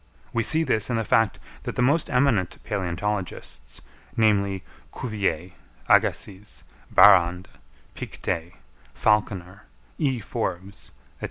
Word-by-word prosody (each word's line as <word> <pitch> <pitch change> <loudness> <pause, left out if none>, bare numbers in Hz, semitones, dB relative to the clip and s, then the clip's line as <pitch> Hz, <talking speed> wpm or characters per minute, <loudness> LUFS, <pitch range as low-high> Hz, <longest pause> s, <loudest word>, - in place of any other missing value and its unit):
We 115 - +1
see 160 +8 +3
this 110 -7 +1
in 120 - 0
the 115 - 0
fact 110 -1 +2 0.2
that - - -5
the 125 - +1
most 145 +6 +2
eminent 125 -8 +2
palæontologists, 95 0 -4 0.4
namely, 100 -4 +2 0.3
Cuvier, 100 -6 -2 0.4
Agassiz, 100 +1 +1 0.3
Barrande, 90 +1 +6 0.5
Pictet, 85 +1 -4 0.4
Falconer, 100 -2 0 0.3
E. 135 -6 +1
Forbes, 95 -1 -4
&c. - - -20
105 Hz, 105 wpm, -25 LUFS, 95-115 Hz, 0.5 s, Barrande